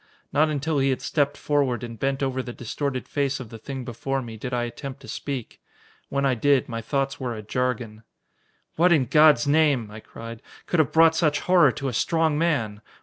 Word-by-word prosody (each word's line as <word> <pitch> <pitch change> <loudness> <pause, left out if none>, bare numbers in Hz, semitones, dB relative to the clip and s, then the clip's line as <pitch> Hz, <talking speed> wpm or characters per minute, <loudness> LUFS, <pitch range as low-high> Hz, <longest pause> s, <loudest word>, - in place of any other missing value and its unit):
Not 155 +2 +3
until 150 0 -1
he 135 0 +2
had 130 - 0
stepped 145 -1 0
forward 135 -6 0
and 115 -2 -7
bent 135 +2 -1
over 130 -1 -1
the 125 -1 -7
distorted 130 +2 -4
face 140 -2 -1
of 125 -4 -8
the 115 -1 -10
thing 130 +2 -6
before 135 +3 -3
me, 115 -2 -8
did 125 +4 -6
I 120 -1 0
attempt 135 +3 -7
to 135 - -12
speak. 135 -5 -5 0.5
When 140 0 0
I 135 - +3
did, 135 +2 +2
my 115 -1 -4
thoughts 135 +3 -2
were 125 -3 -3
a 110 - -7
jargon. 115 -2 -2 0.8
"What, 175 +2 +4
in 150 -6 +4
God's 150 -1 +5
name," 145 -7 +2
I 105 - -9
cried, 115 +1 -10 0.2
"could 175 - 0
have 150 -6 +3
brought 160 0 +5
such 150 -3 +1
horror 180 -1 +5
to 140 - -4
a 130 - -2
strong 160 +5 +1
man? 135 -11 0
135 Hz, 205 wpm, -24 LUFS, 120-145 Hz, 0.8 s, God's